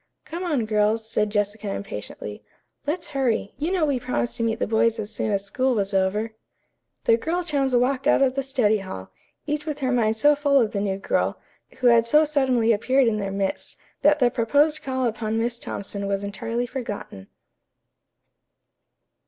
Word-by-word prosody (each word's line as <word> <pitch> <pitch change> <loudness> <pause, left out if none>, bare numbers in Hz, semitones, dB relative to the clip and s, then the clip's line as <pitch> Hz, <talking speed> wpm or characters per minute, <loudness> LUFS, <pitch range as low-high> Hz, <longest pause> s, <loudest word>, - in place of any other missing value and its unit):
"Come 340 +3 -5
on, 295 -10 0
girls," 215 +1 +1
said 210 -1 0
Jessica 205 0 -1
impatiently. 105 - -6 0.4
"Let's 330 +4 -2
hurry. 255 -7 0
You 315 +5 -1
know 365 -5 +2
we 280 -4 0
promised 245 -1 -2
to 230 - -1
meet 225 0 0
the - - 0
boys 225 +1 +2
as 215 +1 -5
soon 215 - -1
as 200 -1 0
school 255 +5 0
was 200 -1 -1
over." 200 +4 0 0.7
The 230 - +4
girl 340 +8 -1
chums 275 -6 0
walked 255 +2 +1
out - - +5
of 260 -1 +2
the 275 - -1
study 250 -6 +1
hall, 140 - -8 0.3
each 300 0 -3
with 300 -2 -2
her 260 -1 +1
mind 225 -3 +2
so 295 +6 +5
full 285 -1 +3
of 225 -4 +1
the 200 - -2
new 195 -1 -1
girl, 195 - -1 0.4
who - - -1
had 235 -1 +6
so 300 +6 +5
suddenly 260 -6 +2
appeared 255 +5 +2
in 220 -2 +1
their 195 -1 -2
midst, 195 0 -3 0.2
that 295 +1 +5
the 250 -4 +3
proposed 290 +6 +2
call 260 -1 -1
upon 225 -1 -1
Miss 235 +1 -1
Thompson 200 -2 -5
was 200 0 -1
entirely 230 +4 -3
forgotten. 210 - -6
230 Hz, 185 wpm, -24 LUFS, 210-275 Hz, 0.7 s, had